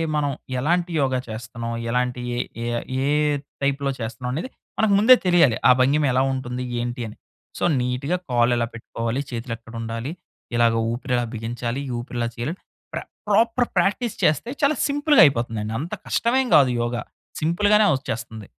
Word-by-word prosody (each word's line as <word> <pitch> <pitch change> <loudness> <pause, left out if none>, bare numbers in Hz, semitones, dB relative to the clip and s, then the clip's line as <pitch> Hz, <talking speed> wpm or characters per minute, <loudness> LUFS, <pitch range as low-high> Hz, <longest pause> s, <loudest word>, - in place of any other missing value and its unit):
మనం 145 -1 +1 0.3
ఎలాంటి 175 +5 +1
యోగ 135 -1 +1
చేస్తున్నాం, 115 +1 -6 0.2
ఎలాంటి 125 +1 0
ఏ - - -3 0.3
ఏ - - -2 0.4
ఏ - - +1 0.5
టైప్‌లో 140 0 0
చేస్తున్నామనేది 125 - -4 0.3
మనకు 215 -2 +3
ముందే 255 +5 +8
తెలియాలి. 170 -10 +5
ఆ - - +10
భంగిమ 140 +4 +3
ఎలా 130 - +3
ఉంటుంది 125 -1 -4 0.2
ఏంటి 120 +1 -3
అని. 105 - -10 0.4
సో, - - -3 0.2
నీట్‌గా 125 +8 -1
కాలెలా 120 -1 +2
పెట్టుకోవాలి, 115 +3 -3
చేతులెక్కడ 115 -1 -6
ఉండాలి, 115 +5 -4 0.4
ఇలాగ 115 -1 +4 0.2
ఊపిరి 125 +2 -3
ఎలా 120 - 0
బిగించాలి. 120 +3 -3
ఈ - - -3
ఊపిరి 120 0 -6
ఇలా 115 - 0
చేయాలని, 150 +10 -4 0.3
ప్ర - - -2 0.3
ప్రాపర్ 230 +4 +3
ప్రాక్టీస్ 200 +6 +1
చేస్తే 155 - +2
చాలా 285 +2 +4
సింపుల్‌గా 290 +1 +4
అయిపోతుందండి. 115 -5 0
అంత 165 +4 -5
కష్టమేమి 250 +2 +1
గాదు 130 -4 +5
యోగ. 120 +1 -1 0.5
సింపుల్‌గానే 205 +6 +4
వచ్చేస్తుంది. 115 -5 -5
125 Hz, 150 wpm, -23 LUFS, 120-170 Hz, 0.5 s, ఆ